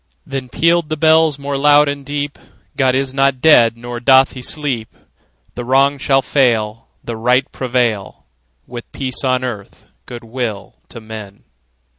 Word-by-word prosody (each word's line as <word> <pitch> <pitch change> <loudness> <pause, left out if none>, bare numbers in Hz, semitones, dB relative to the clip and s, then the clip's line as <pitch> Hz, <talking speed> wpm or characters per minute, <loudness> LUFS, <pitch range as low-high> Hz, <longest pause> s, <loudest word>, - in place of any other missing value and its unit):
Then 135 -2 -5
pealed 165 +4 +1
the 155 - -2
bells 160 -1 +3
more 140 0 -4
loud 145 +1 +5
and 140 0 -4
deep: 145 +1 -4 0.4
"God 130 -2 +2
is 135 0 -1
not 135 -1 +1
dead; 120 -6 +5
nor 120 0 -7
doth 130 +2 +4
he 130 - -8
sleep! 130 -5 -3 0.6
The 120 - -6
Wrong 135 +3 +2
shall 135 0 +2
fail, 115 -5 0 0.2
The 115 - -5
Right 125 +4 +2
prevail, 120 -6 -2 0.4
With 120 -1 -10
peace 130 -1 -3
on 130 -1 0
earth, 110 -6 -7 0.2
good 120 -1 -9
will 110 -5 -5
to 120 - -9
men!" 110 -3 -10
130 Hz, 155 wpm, -17 LUFS, 120-140 Hz, 0.6 s, loud